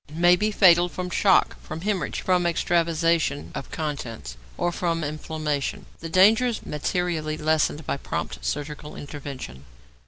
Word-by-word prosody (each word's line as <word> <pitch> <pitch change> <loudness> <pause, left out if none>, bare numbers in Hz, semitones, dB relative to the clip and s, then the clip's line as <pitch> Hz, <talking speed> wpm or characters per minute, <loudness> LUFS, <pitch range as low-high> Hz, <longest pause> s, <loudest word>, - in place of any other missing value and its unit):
= - - -8
May 175 - +8
be 210 +4 0
fatal 175 -4 +5
from 180 0 -5
shock, 190 +1 +3
from 155 +1 -7
hæmorrhage, 200 -1 -2
from 180 -2 +2
extravasation 165 -3 +1
of - - -6
contents, 120 - -5 0.2
or 175 - 0
from 165 -2 -1
inflammation. 150 -1 -3
The 165 - -6
danger 210 +8 +5
is 235 -3 -3
materially 155 0 -2
lessened 155 -1 +1
by - - -1
prompt 65 - -5
surgical 150 - -4
intervention. 135 - -8
160 Hz, 145 wpm, -25 LUFS, 145-175 Hz, 0.2 s, May